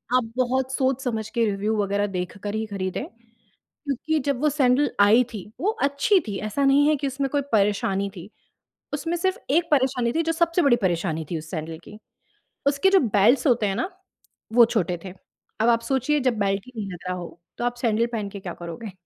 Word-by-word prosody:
आप 255 Hz, -, +4 dB
बहुत 260 Hz, +1 st, 0 dB
सोच-समझ 255 Hz, -5 st, -1 dB
के, 235 Hz, -1 st, +1 dB
रिव्यू 210 Hz, +1 st, -1 dB
वग़ैरह 205 Hz, 0 st, 0 dB
देखकर 195 Hz, +2 st, -5 dB
ही 220 Hz, 0 st, -1 dB
खरीदें। 190 Hz, -3 st, -4 dB, 0.6 s
क्योंकि 305 Hz, +2 st, -3 dB
जब 275 Hz, -3 st, 0 dB
वो 300 Hz, -, +3 dB
सैंडल 275 Hz, 0 st, +3 dB
आई 215 Hz, +5 st, +6 dB
थी 205 Hz, -4 st, -6 dB, 0.2 s
वो 405 Hz, +5 st, +2 dB
अच्छी 280 Hz, +8 st, +3 dB
थी, 200 Hz, -, -3 dB
ऐसा 215 Hz, +7 st, -1 dB
नहीं 280 Hz, +2 st, +5 dB
है 305 Hz, -, +4 dB
कि 280 Hz, 0 st, -3 dB
उसमें 270 Hz, +1 st, -1 dB
कोई 285 Hz, -1 st, +1 dB
परेशानी 200 Hz, -1 st, +1 dB
थी। 180 Hz, +5 st, -9 dB, 0.6 s
उसमें 330 Hz, +4 st, -2 dB
सिर्फ़ 375 Hz, +2 st, 0 dB, 0.2 s
एक 335 Hz, +1 st, +2 dB
परेशानी 260 Hz, -4 st, +2 dB
थी, 330 Hz, -, +2 dB
जो 330 Hz, -, 0 dB
सबसे 335 Hz, +1 st, +2 dB
बड़ी 275 Hz, -5 st, +5 dB
परेशानी 165 Hz, -3 st, -1 dB
थी 165 Hz, -, -1 dB
उस 160 Hz, +1 st, -9 dB
सैंडल 160 Hz, -1 st, -5 dB
की। 210 Hz, -, -12 dB, 0.7 s
उसके 280 Hz, +7 st, +3 dB
जो 390 Hz, -, +5 dB
बेल्ट्स 230 Hz, +4 st, +3 dB
होते 235 Hz, -5 st, +3 dB
हैं 195 Hz, -, 0 dB
ना, 350 Hz, +11 st, -2 dB, 0.6 s
वो 240 Hz, 0 st, +8 dB
छोटे 180 Hz, -7 st, -1 dB
थे। 185 Hz, -, -7 dB, 0.5 s
अब 230 Hz, -, +3 dB
आप 230 Hz, -1 st, +4 dB
सोचिए 270 Hz, +4 st, +1 dB
जब 250 Hz, -4 st, 0 dB
बेल्ट 195 Hz, -1 st, 0 dB
ही 255 Hz, -, -13 dB
नहीं 205 Hz, -2 st, -4 dB
लग 175 Hz, -, -7 dB
रहा 180 Hz, -, -2 dB
हो, 175 Hz, -1 st, -9 dB, 0.2 s
तो 240 Hz, -, -2 dB
आप 245 Hz, 0 st, 0 dB
सैंडल 230 Hz, -1 st, +1 dB
पहन 215 Hz, -3 st, -2 dB
के 200 Hz, 0 st, -8 dB
क्या 175 Hz, -2 st, -6 dB
करोगे? 175 Hz, +5 st, -8 dB
235 Hz, 205 wpm, -24 LUFS, 200-280 Hz, 0.7 s, वो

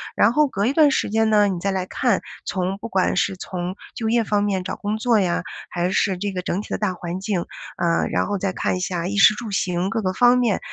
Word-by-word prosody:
然 215 Hz, -, +4 dB
后 300 Hz, +4 st, +3 dB
隔 200 Hz, -6 st, -1 dB
一 265 Hz, -, +1 dB
段 300 Hz, -1 st, +5 dB
时 -, -, 0 dB
间 220 Hz, +1 st, +2 dB
呢， 210 Hz, -1 st, +5 dB
你 190 Hz, -3 st, -2 dB
再 195 Hz, +3 st, -1 dB
来 190 Hz, -1 st, -2 dB
看， 240 Hz, -3 st, +1 dB, 0.2 s
从 185 Hz, +1 st, -2 dB
不 220 Hz, -, -7 dB
管 190 Hz, -5 st, +1 dB
是 190 Hz, -, +1 dB
从 180 Hz, 0 st, -5 dB, 0.2 s
就 225 Hz, -1 st, -2 dB
业 235 Hz, 0 st, +3 dB
方 205 Hz, -1 st, +1 dB
面 195 Hz, -3 st, -1 dB
找 185 Hz, -, -4 dB
工 210 Hz, +1 st, -3 dB
作 225 Hz, 0 st, +2 dB
呀， 180 Hz, -3 st, 0 dB, 0.3 s
还 175 Hz, 0 st, -1 dB
是 190 Hz, -1 st, +1 dB
这 200 Hz, +2 st, -3 dB
个 185 Hz, -1 st, -3 dB
整 180 Hz, +2 st, -2 dB
体 -, -, -12 dB
的 -, -, -1 dB
大 210 Hz, -3 st, -1 dB
环 175 Hz, 0 st, -5 dB
境， 195 Hz, -3 st, -2 dB, 0.3 s
呃， 170 Hz, -1 st, +1 dB
然 -, -, +1 dB
后 205 Hz, -, -2 dB
再 195 Hz, 0 st, -1 dB
看 -, -, -1 dB
一 -, -, -4 dB
下 180 Hz, -1 st, -2 dB
衣 205 Hz, +2 st, -3 dB
食 195 Hz, -, +7 dB
住 225 Hz, -1 st, -6 dB
行 185 Hz, -2 st, 0 dB
各 225 Hz, +2 st, -1 dB
个 185 Hz, -2 st, 0 dB
方 245 Hz, +4 st, +5 dB
面 240 Hz, -5 st, +1 dB
195 Hz, 280 characters per minute, -22 LUFS, 185-220 Hz, 0.3 s, 食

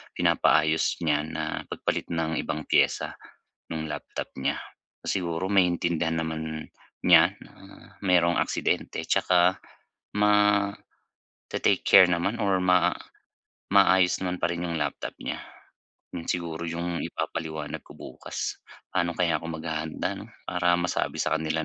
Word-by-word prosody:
pinapaayos 80 Hz, +1 st, +3 dB
niya 75 Hz, -2 st, +2 dB
na 80 Hz, -, -4 dB, 0.2 s
pagpalit -, -, -2 dB
ng 80 Hz, -1 st, -1 dB
ibang 75 Hz, 0 st, -3 dB
piyesa -, -, +2 dB, 0.6 s
nung 80 Hz, -1 st, -4 dB
laptop 75 Hz, -, -6 dB
niya. 65 Hz, -, 0 dB, 0.5 s
Siguro 85 Hz, -1 st, -1 dB
maintindihan 85 Hz, -3 st, +2 dB
naman 80 Hz, -1 st, -4 dB, 0.4 s
niya -, -, +6 dB
na -, -, -17 dB, 0.5 s
merong 90 Hz, -3 st, +3 dB
aksidente -, -, -1 dB
tsaka 90 Hz, +1 st, +3 dB, 0.6 s
mate-take 105 Hz, -1 st, +2 dB, 0.9 s
care 95 Hz, -2 st, +7 dB
naman 85 Hz, +7 st, 0 dB
or 95 Hz, -2 st, +2 dB
ma 90 Hz, -1 st, +4 dB, 0.8 s
maayos 95 Hz, -2 st, +5 dB
naman 90 Hz, 0 st, -2 dB
pa -, -, +1 dB
rin 85 Hz, 0 st, -3 dB
'yung 85 Hz, -1 st, -2 dB
laptop 75 Hz, -1 st, -3 dB
niya. -, -, -4 dB, 0.7 s
'Yun 85 Hz, -, -6 dB
siguro 85 Hz, -2 st, -3 dB
yung 85 Hz, +1 st, -3 dB
ipapaliwanag 80 Hz, -2 st, -4 dB
ko -, -, -15 dB
bukas. -, -, -6 dB, 0.3 s
Paano 85 Hz, -2 st, 0 dB
kaya 85 Hz, -2 st, +2 dB
ako 80 Hz, -, -7 dB
maghahanda 80 Hz, -1 st, -3 dB
‘no? -, -, -9 dB, 0.2 s
Para 90 Hz, -1 st, +2 dB
masabi 90 Hz, +1 st, -1 dB
sa 80 Hz, -, +1 dB
kanila 80 Hz, 0 st, -1 dB
85 Hz, 125 wpm, -26 LUFS, 80-90 Hz, 0.9 s, care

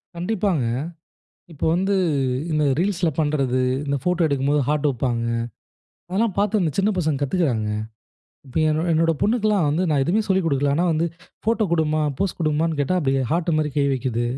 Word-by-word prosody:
கண்டிப்பாங்க. 180 Hz, -, 0 dB, 0.9 s
இப்ப 150 Hz, -, -5 dB
வந்து 190 Hz, +3 st, +1 dB, 0.6 s
இந்த 150 Hz, -1 st, +1 dB
Reelsல 185 Hz, -1 st, +1 dB
பண்றது, 140 Hz, -5 st, +1 dB, 0.2 s
இந்த 140 Hz, 0 st, -1 dB
ஃபோட்டோ 180 Hz, +1 st, +1 dB
எடுக்கும்போது 140 Hz, 0 st, +1 dB
ஹார்ட் 150 Hz, 0 st, +1 dB
வைப்பாங்க, 120 Hz, -3 st, -1 dB, 0.8 s
அதெல்லாம் 200 Hz, +2 st, 0 dB
பார்த்து 210 Hz, +1 st, +2 dB
இந்த 165 Hz, -, +1 dB
சின்ன 200 Hz, +2 st, +3 dB
பசங்க 155 Hz, -5 st, 0 dB
கத்துக்குறாங்க. 135 Hz, -, 0 dB, 0.8 s
இப்ப 130 Hz, -, -14 dB
என்ன 155 Hz, +2 st, 0 dB
என்னோட 165 Hz, +1 st, +3 dB
பொண்ணுக்கலாம் 210 Hz, -5 st, +2 dB
வந்து 155 Hz, +5 st, +1 dB
நான் 145 Hz, -3 st, +2 dB
எதுவுமே 200 Hz, +9 st, +1 dB
சொல்லிக் 190 Hz, -2 st, +2 dB
குடுக்கல. 140 Hz, -2 st, +1 dB
ஆனா 175 Hz, -, +2 dB
வந்து 160 Hz, +2 st, +1 dB, 0.4 s
ஃபோட்டோ 225 Hz, 0 st, +2 dB
குடுமா, 155 Hz, -2 st, +1 dB, 0.2 s
போஸ் 195 Hz, -2 st, -1 dB
குடுமான்னு 160 Hz, -1 st, 0 dB
கேட்டா 145 Hz, +6 st, +1 dB
அப்படியே 135 Hz, -3 st, +1 dB
ஹார்ட் 170 Hz, +1 st, 0 dB
மாரி 150 Hz, -1 st, 0 dB
கை 145 Hz, -, +3 dB
வைக்குது. 125 Hz, -3 st, -1 dB
160 Hz, 160 wpm, -22 LUFS, 140-185 Hz, 0.9 s, சின்ன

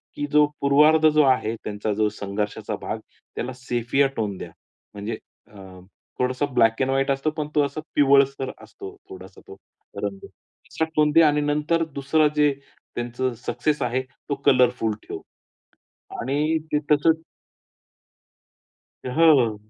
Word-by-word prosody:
की 145 Hz, -, -2 dB
"जो 150 Hz, 0 st, +6 dB, 0.2 s
पूर्वार्ध 150 Hz, +3 st, +5 dB
जो 155 Hz, 0 st, +4 dB
आहे 125 Hz, -4 st, +2 dB
त्यांचा 105 Hz, 0 st, -3 dB
जो 105 Hz, +1 st, +1 dB
संघर्षाचा 105 Hz, +1 st, -3 dB
भाग -, -, -4 dB, 0.4 s
त्याला 125 Hz, +2 st, -4 dB
सेफिया 125 Hz, +2 st, 0 dB
टोन 105 Hz, -3 st, -2 dB
द्या. -, -, -7 dB, 0.4 s
म्हणजे 105 Hz, +2 st, -5 dB, 0.3 s
अ, 105 Hz, -, -15 dB, 0.6 s
थोडासा 125 Hz, +3 st, 0 dB
ब्लॅक 115 Hz, +1 st, +3 dB
एंड 130 Hz, -, +1 dB
व्हाईट 135 Hz, +1 st, +1 dB
असतो 135 Hz, +3 st, 0 dB
पण 150 Hz, -1 st, -2 dB
तो 150 Hz, -, +4 dB
असा 140 Hz, +2 st, -5 dB
पिवळसर 140 Hz, -1 st, +3 dB
असतो 395 Hz, -1 st, -10 dB
थोडासा 385 Hz, -, -12 dB
तो 405 Hz, -, -10 dB, 0.5 s
रंग. 195 Hz, -, -3 dB, 0.5 s
"सेफिया 155 Hz, +4 st, -1 dB
टोन 150 Hz, -1 st, +3 dB
द्या. 165 Hz, +1 st, +6 dB
आणि 150 Hz, 0 st, +2 dB
नंतर 150 Hz, +3 st, +1 dB
दुसरा 145 Hz, +3 st, +2 dB
जे 150 Hz, -1 st, +4 dB, 0.4 s
त्यांचं 120 Hz, +1 st, -2 dB
सक्सेस 150 Hz, -2 st, -1 dB
आहे 125 Hz, +1 st, 0 dB
तो 135 Hz, +2 st, -7 dB
कलरफुल 125 Hz, -4 st, +3 dB
ठेव." -, -, -5 dB, 1.0 s
आणि 150 Hz, +5 st, 0 dB
ते 150 Hz, -, +3 dB
तसंच 160 Hz, +2 st, +3 dB, 1.8 s
हो, 140 Hz, +6 st, +1 dB, 0.2 s
हो. 115 Hz, -3 st, +1 dB
140 Hz, 140 wpm, -23 LUFS, 120-150 Hz, 1.8 s, जो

